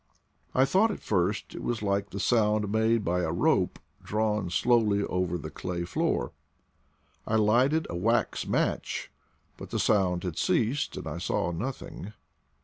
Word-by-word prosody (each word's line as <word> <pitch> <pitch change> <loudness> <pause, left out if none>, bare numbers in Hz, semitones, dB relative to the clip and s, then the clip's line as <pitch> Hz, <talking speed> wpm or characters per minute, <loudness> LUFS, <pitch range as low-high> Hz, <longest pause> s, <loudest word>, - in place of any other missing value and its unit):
I 130 - +5
thought 195 +10 +3
at 205 - -4
first 100 +1 -1
it - - -7
was 120 -3 -2
like 100 0 0
the 100 - -6
sound 105 -2 +2
made 110 0 +2
by 90 +1 +1
a - - -1
rope - - +2 0.3
drawn 105 -3 0
slowly 105 0 +2
over 90 -2 -1
the 75 - -7
clay 90 -1 -4
floor. 85 -7 -1 1.0
I 110 - +1
lighted 125 +9 +3
a 85 - -5
wax 115 +7 0
match, - - -1 0.5
but - - -9
the - - -2
sound 90 -4 +2
had 90 -4 -3
ceased, 125 +6 0
and - - -6
I - - -4
saw 85 - -1
nothing. 105 0 -6
105 Hz, 155 wpm, -28 LUFS, 90-115 Hz, 1.0 s, I